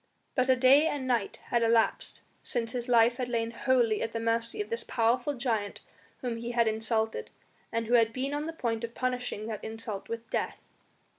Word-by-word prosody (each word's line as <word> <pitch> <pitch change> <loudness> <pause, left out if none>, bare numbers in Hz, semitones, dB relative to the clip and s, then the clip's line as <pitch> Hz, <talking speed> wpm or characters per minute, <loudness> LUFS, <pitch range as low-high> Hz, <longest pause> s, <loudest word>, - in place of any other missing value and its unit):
But 255 -1 +1
a 260 - +7
day 270 +5 +6
and 290 -4 -2
a - - -5
night 240 -6 0
had 235 - +3
elapsed 230 -1 +2 0.2
since 230 -2 -2
his 245 -1 -3
life 235 0 +5
had 250 -2 -2
lain 230 -1 -1
wholly 235 -3 +2
at 225 - -2
the 230 - -1
mercy 230 - 0
of 415 - -2
this 465 0 -2
powerful 245 +5 +1
giant 225 -5 -2 0.4
whom 245 -3 -2
he 235 +1 -4
had 235 -1 +3
insulted, 220 0 0 0.4
and 230 0 -1
who 235 - -1
had 230 -2 +5
been 265 +4 -2
on 295 +2 -2
the 325 - -4
point 235 -7 -2
of 235 0 -5
punishing 250 -4 -2
that 220 -2 -5
insult 220 -2 -6
with 230 0 -5
death. - - -1
235 Hz, 205 wpm, -29 LUFS, 225-255 Hz, 0.4 s, a